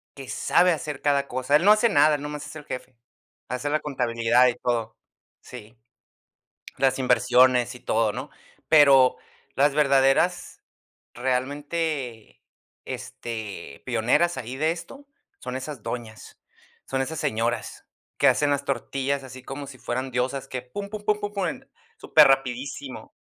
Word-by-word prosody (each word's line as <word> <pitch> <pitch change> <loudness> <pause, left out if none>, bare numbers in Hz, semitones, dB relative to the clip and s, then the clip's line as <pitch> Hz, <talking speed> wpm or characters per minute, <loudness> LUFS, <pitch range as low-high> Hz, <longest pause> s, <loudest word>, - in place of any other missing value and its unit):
que 135 -2 -9
sabe 180 +1 +3
hacer 150 -3 -4
cada 140 -1 +1
cosa. 130 +3 0
Él 170 - -3
no 205 - +8
hace 215 +2 +4
nada, 150 -5 +4
nomás 150 0 -6
es - - -11
el 150 -2 -9
jefe, 130 -1 -7 0.5
hace 125 +3 -3
la 155 +1 +1
contabilidad, 125 -3 +2
y 120 - 0
todo, 120 -2 -2 0.4
sí. 115 -2 -12 1.0
Las 135 0 +2
inversiones, 125 0 +3
y - - -11
todo, 115 -3 +1
¿no? 130 +7 -6 0.4
Pero 140 -4 +6 0.4
las 145 +1 +3
verdaderas, 140 +4 +2 0.5
realmente, 135 0 -3 0.4
este, 110 -10 -7
pioneras 125 +9 +1
ahí 125 0 -6
de 155 +3 +1
esto 175 +12 -9 0.3
son 125 0 -6
esas 130 -3 -6
doñas, 115 -3 -7 0.5
son 135 0 -2
esas 155 +3 -4
señoras, 115 +2 -2 0.3
que - - +4
hacen 145 - +2
las 140 0 0
tortillas 135 +1 -2
así 130 -1 -11
como 135 +2 -7
si 135 -1 -11
fueran 130 +2 -4
diosas, 130 +2 -2
que 130 -2 -4
pum, 200 +11 -7
pum, 210 0 -7
pum, 210 0 +2
pum, 205 0 -5
pum, 200 +6 -2 0.4
súper 155 -1 +6
rapidísimo. 135 0 -2
135 Hz, 145 wpm, -25 LUFS, 125-150 Hz, 1.0 s, no